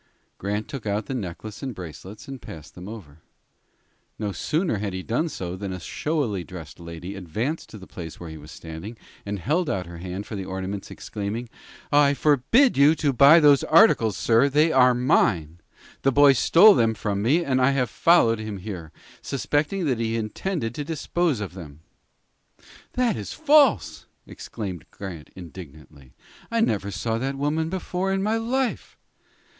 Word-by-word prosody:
Grant 105 +2 -3
took 135 -7 -7
out 105 +1 -1
the - - -5
necklace 105 -1 -6
and 130 -4 -5
bracelets, 95 +3 -10
and 135 -3 -8
passed 80 -2 -11
them 90 +1 -10
over. 85 -10 -11 1.0
No 105 -2 -3
sooner 155 - -1
had 100 -2 -3
he 95 0 -5
done 140 - -1
so 90 - -5
than 95 0 -5
a 95 - -5
showily 115 - -2
dressed 85 -3 -10
lady 85 +2 -8
advanced 105 - -4
to 110 - -10
the 95 - -11
place 80 -4 -9
where 85 -2 -8
he 80 - -8
was 75 +1 -13
standing, 80 +8 -9 0.3
and 100 0 -2
held 155 - 0
out 95 -2 -2
her 85 0 -10
hand 95 +3 -6
for 110 - -7
the 95 - -4
ornaments, 95 +1 -5
exclaiming: 105 +4 -5 0.4
"I 145 -1 +4
forbid 150 - +3
you 145 +3 +6
to 145 -4 0
buy 140 +6 +8
those 145 -3 +5
articles, 135 - +5
sir. 115 +5 +3
They 150 +3 +3
are 125 -2 +5
mine. 85 - +1 0.4
The 135 - +3
boy 145 +1 +6
stole 180 - +7
them 115 -8 +2
from 100 -2 -2
me, 155 +11 +2
and 130 -1 +1
I 125 - +5
have 135 -2 +1
followed 115 -10 +4
him 110 -2 -5
here, 90 -5 -7 0.3
suspecting 145 +6 -1
that 130 -6 0
he 115 -1 -1
intended 115 - -3
to 145 - -4
dispose 160 -1 -1
of 100 -4 -5
them." 80 -5 -11 1.1
"That 250 -3 +1
is - - -6
false," 285 - +3 0.2
exclaimed 95 -7 -7
Grant, 90 -6 -9
indignantly. 75 -6 -12 0.3
"I 230 - 0
never 100 - 0
saw 110 +5 -2
that 135 +2 -2
woman 150 +3 -1
before 185 +1 -2
in 195 0 0
my 215 +2 +1
life." 245 +2 -2
115 Hz, 170 wpm, -24 LUFS, 95-145 Hz, 1.1 s, buy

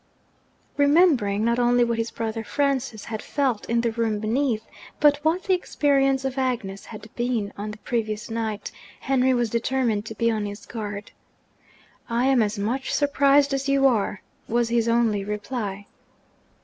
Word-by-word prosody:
Remembering, 285 - +4
not 235 +1 +2
only 245 0 +4
what 235 -1 0
his 225 0 -1
brother 225 0 -4
Francis 265 -5 -1
had 220 -1 -5
felt 260 -6 -1
in 235 0 +2
the 235 -1 0
room 225 -2 -1
beneath, 220 +1 0 0.3
but 295 -1 +5
what 330 +4 +1
the 385 - +2
experience 275 -6 +1
of 265 0 -2
Agnes 225 -7 -2
had 215 -1 -10
been 240 -4 -1
on 205 +1 -5
the 210 - -7
previous 215 -2 -3
night, 225 -2 -3 0.3
Henry 260 -1 +2
was 240 -3 0
determined 235 -3 0
to 220 - -7
be 230 +2 +1
on 215 -2 -2
his 205 +1 -8
guard. 205 -3 -6 1.0
'I 235 +2 +1
am 265 -2 +4
as 210 0 0
much 235 +6 -2
surprised 285 0 +3
as 275 0 -1
you 275 0 +3
are,' 215 -6 +1 0.2
was 235 0 +1
his 235 -1 +1
only 230 -3 +2
reply. 205 -1 -4
235 Hz, 160 wpm, -24 LUFS, 215-265 Hz, 1.0 s, but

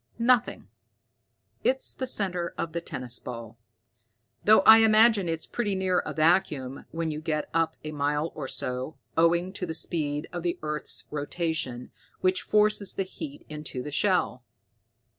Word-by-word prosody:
"Nothing. 240 +1 +2 1.0
It's 265 +1 +3
the 260 - -4
center 180 -7 0
of 165 - -3
the 170 - -2
tennis 125 -6 -5
ball, 115 -2 -8 0.8
though 215 +1 +6
I 220 0 +9
imagine 220 -3 +5
it's 165 -1 -2
pretty 210 -5 -2
near 185 -1 +1
a - - -4
vacuum 155 -5 +1
when 165 0 -3
you 150 0 -5
get 155 -2 -2
up 165 0 +1
a 155 - -5
mile 145 +2 -1
or 140 -3 -5
so, 130 +3 -4 0.2
owing 170 +3 +2
to 185 -2 -4
the 160 - -4
speed 150 -3 -2
of 175 - -3
the 175 0 -1
earth's 150 -7 -4
rotation, 150 -4 -3 0.3
which 185 0 +2
forces 210 -1 +2
the 195 - 0
heat 285 +10 -9
into 150 -4 -6
the 150 - -6
shell." 160 - +1
165 Hz, 155 wpm, -27 LUFS, 150-195 Hz, 1.0 s, I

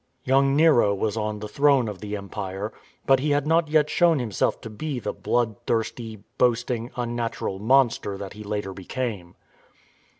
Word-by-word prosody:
Young 135 +1 +3
Nero 140 -10 +5
was 105 +2 -1
on 105 -1 -2
the 105 0 -6
throne 140 +1 +3
of 105 -3 -6
the 105 0 -4
Empire, 100 +1 -5 0.3
but 135 -1 +5
he 150 +3 -1
had 145 0 +2
not 165 +1 +3
yet 150 0 +3
shown 170 +1 +3
himself 120 -6 -1
to 115 - -7
be 145 +5 -4
the - - -3
bloodthirsty, 115 -1 -2 0.2
boasting, 120 -1 +1
unnatural 120 -5 -3
monster 115 -3 +2
that 100 -1 -7
he 105 +1 -9
later 105 -2 -3
became. 95 -3 -5
115 Hz, 160 wpm, -25 LUFS, 105-135 Hz, 0.3 s, Nero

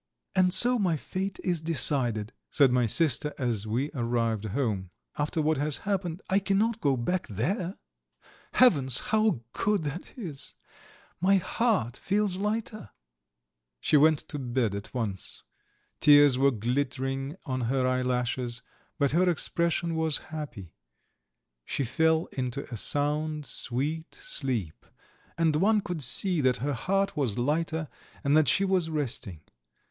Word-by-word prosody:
"And 185 -1 +4
so 240 +6 +6
my 180 -6 +1
fate 190 +6 -4
is 175 -3 0
decided," 130 -9 +2 0.2
said 140 -4 +4
my 125 -2 +2
sister, 150 +3 +1
as 115 -6 -1
we 125 +7 -1
arrived 115 -5 -1
home. 105 -5 -2 0.3
"After 150 +2 -1
what 155 0 +2
has 150 0 0
happened 190 -3 -2
I 195 - +3
cannot 210 +3 0
go 140 -6 +2
back 180 +10 -1
there. 175 - -2 0.8
Heavens, 140 - +5
how 220 - +1
good 205 -4 0
that 150 +4 -6
is! 160 - -5 0.6
My 190 +3 +4
heart 190 - 0
feels 200 -1 0
lighter." 210 - -3 0.9
She 150 - +1
went 155 +1 +6
to 145 - -5
bed 120 -4 -1
at 100 +2 -6
once. 110 -7 -4 0.6
Tears 145 -2 +7
were 135 +2 +4
glittering 135 +4 -2
on 130 -1 -2
her 130 -1 +1
eyelashes, 125 -1 -1 0.3
but 140 -3 +1
her 180 +4 +3
expression 170 0 0
was 160 -2 +1 0.2
happy; 120 - -7 0.9
she 140 - -2
fell 160 +6 +2
into 130 +1 -3
a - - -2
sound 150 +4 0
sweet 150 +8 -3
sleep, 120 - -3 0.5
and 160 -2 +2
one 210 +6 +3
could 175 -5 -5
see 170 - +1
that 130 -2 +2
her 145 +3 -2
heart 195 +10 0
was 130 -9 -1
lighter 155 +4 -1 0.4
and 140 +1 +3
that 155 -2 +4
she 195 +11 +3
was 185 -4 +1
resting. 125 - -4
145 Hz, 140 wpm, -28 LUFS, 125-175 Hz, 0.9 s, Tears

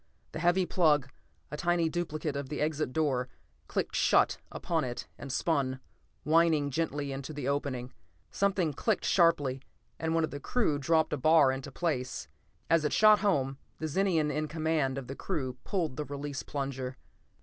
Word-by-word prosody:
The 160 - -5
heavy 175 +2 +3
plug, 150 -8 +2 0.4
a 150 - -4
tiny 170 0 +2
duplicate 155 -3 -3
of 140 -2 -4
the 150 - -4
exit 155 -3 -1
door, 130 -5 0 0.4
clicked - - -2
shut - - +3
upon 165 -2 -1
it 120 -1 -4
and 140 - -8
spun, 135 -3 0 0.4
whining 155 -2 +3
gently, 145 -1 -2
into 135 +3 -5
the 145 -3 -4
opening. 135 -3 -2 0.4
Something 190 -6 +1
clicked 215 - 0
sharply, 145 -7 +3 0.4
and 160 0 -1
one 165 - +2
of 160 - -1
the 145 - -5
crew 155 - 0
dropped 160 +2 +2
a - - 0
bar 155 -1 +5
into 130 0 -5
place. 140 -7 -2 0.4
As 165 -1 +3
it 150 - 0
shot 215 -1 +6
home, 140 -10 +1 0.2
the 155 - -3
Zenian 160 -2 +1
in 155 +1 -1
command 155 -4 0
of 135 - -4
the 135 - -6
crew 135 -9 -3
pulled 165 -9 -1
the 150 - -2
release 145 -1 -5
plunger. 135 -2 -4
150 Hz, 170 wpm, -30 LUFS, 135-165 Hz, 0.4 s, shot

